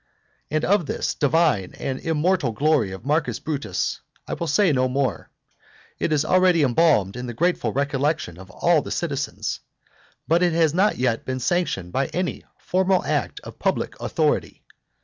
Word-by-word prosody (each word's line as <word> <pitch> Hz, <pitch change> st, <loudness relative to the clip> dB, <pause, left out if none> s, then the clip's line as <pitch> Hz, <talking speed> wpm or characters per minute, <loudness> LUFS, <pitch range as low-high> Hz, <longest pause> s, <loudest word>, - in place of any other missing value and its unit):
And 155 Hz, +1 st, 0 dB
of 195 Hz, -5 st, +2 dB
this 145 Hz, -, -2 dB
divine 145 Hz, -, +1 dB
and 130 Hz, -1 st, -3 dB
immortal 160 Hz, -4 st, 0 dB
glory 135 Hz, -6 st, +2 dB
of 95 Hz, +5 st, -9 dB
Marcus 150 Hz, +2 st, 0 dB
Brutus 140 Hz, -, -3 dB, 0.3 s
I -, -, -3 dB
will 170 Hz, -, -3 dB
say 175 Hz, +4 st, +3 dB
no 130 Hz, -2 st, +1 dB
more, 130 Hz, -3 st, -1 dB, 0.7 s
it -, -, -1 dB
is 155 Hz, 0 st, +2 dB
already 185 Hz, -3 st, +4 dB
embalmed 125 Hz, -, +3 dB
in 125 Hz, 0 st, -5 dB
the 120 Hz, -, -6 dB
grateful 170 Hz, -7 st, +1 dB
recollection 140 Hz, -, -1 dB
of 95 Hz, 0 st, -12 dB
all -, -, +2 dB
the -, -, -8 dB
citizens, -, -, -3 dB, 0.7 s
but 165 Hz, +2 st, +3 dB
it 175 Hz, -2 st, +3 dB
has 160 Hz, -2 st, +3 dB
not 195 Hz, +5 st, +2 dB
yet 120 Hz, -3 st, 0 dB
been 130 Hz, 0 st, -3 dB
sanctioned 125 Hz, -, -1 dB
by 135 Hz, 0 st, +1 dB
any 180 Hz, 0 st, -3 dB
formal 185 Hz, 0 st, +1 dB
act -, -, -1 dB
of -, -, -11 dB
public -, -, -1 dB
authority. -, -, -1 dB
150 Hz, 165 wpm, -23 LUFS, 125-170 Hz, 0.7 s, already